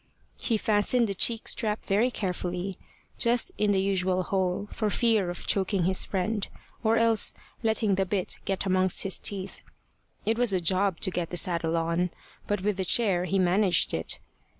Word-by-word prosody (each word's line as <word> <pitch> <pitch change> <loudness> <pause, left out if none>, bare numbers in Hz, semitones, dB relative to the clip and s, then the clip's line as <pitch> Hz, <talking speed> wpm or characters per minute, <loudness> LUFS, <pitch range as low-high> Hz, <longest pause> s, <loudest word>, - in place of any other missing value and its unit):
He 230 - 0
fastened 215 +3 +2
the 200 - -2
cheek 225 +4 +1
strap 215 -2 0
very 210 +6 +2
carefully, 180 -3 -3 0.4
just 235 0 +2
in 210 - +2
the 200 -1 +3
usual 185 -1 +1
hole, 190 +1 -1
for 215 - -1
fear 220 -4 +2
of 175 - -6
choking 195 -1 +1
his 185 +2 +2
friend, 200 +2 -2 0.4
or 225 0 +3
else 230 -1 +3 0.3
letting 220 -2 +1
the 190 0 +1
bit 190 -1 -2
get 195 0 -2
amongst 185 -1 +2
his 195 - -2
teeth. 195 -1 -3 0.6
It 225 +2 0
was 245 -5 +2
a 185 - +2
job 185 +1 +1
to 185 - +2
get 175 -2 -3
the 175 - -3
saddle 170 -1 0
on; 170 +2 0 0.4
but 205 -2 -1
with 205 0 -1
the 190 - -1
chair 185 -3 +2
he 195 +1 0
managed 185 +1 +3
it. 80 - -2
195 Hz, 175 wpm, -27 LUFS, 180-215 Hz, 0.6 s, the